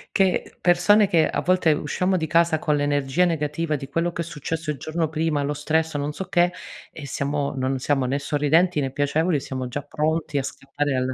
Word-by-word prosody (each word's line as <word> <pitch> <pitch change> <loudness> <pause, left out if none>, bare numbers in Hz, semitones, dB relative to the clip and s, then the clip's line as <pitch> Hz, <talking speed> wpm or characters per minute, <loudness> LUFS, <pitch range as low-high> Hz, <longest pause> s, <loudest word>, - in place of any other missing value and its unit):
che 190 -2 +1
persone 190 +4 +4
che, 170 -5 +3
a - - -1
volte 180 -3 +3
usciamo 180 +5 0
di 160 - -1
casa 165 0 +3
con 150 -1 0
l'energia 145 +3 +1
negativa 155 -1 -1
di 135 -1 -6
quello 165 +4 0
che 170 - -3
è - - -10
successo 160 0 -4
il 150 - -6
giorno 160 +4 -2
prima, 155 -1 -1
lo 145 +1 -1
stress, 160 +2 0
o - - -2
non 145 +1 -3
so 190 - -5
che 175 -1 +2 0.4
e 155 - -9
siamo 140 +1 -2
non 130 0 -1
siamo 135 0 0
né 130 +3 0
sorridenti 150 +4 +2
né 135 -1 -2
piacevoli 150 +4 +1
e - - -2
siamo 130 -1 -5
già 125 +4 -4
pronti 150 +1 -1
a - - -2
scappare 140 +1 -3
alla. 130 0 -1
150 Hz, 215 wpm, -23 LUFS, 145-165 Hz, 0.4 s, persone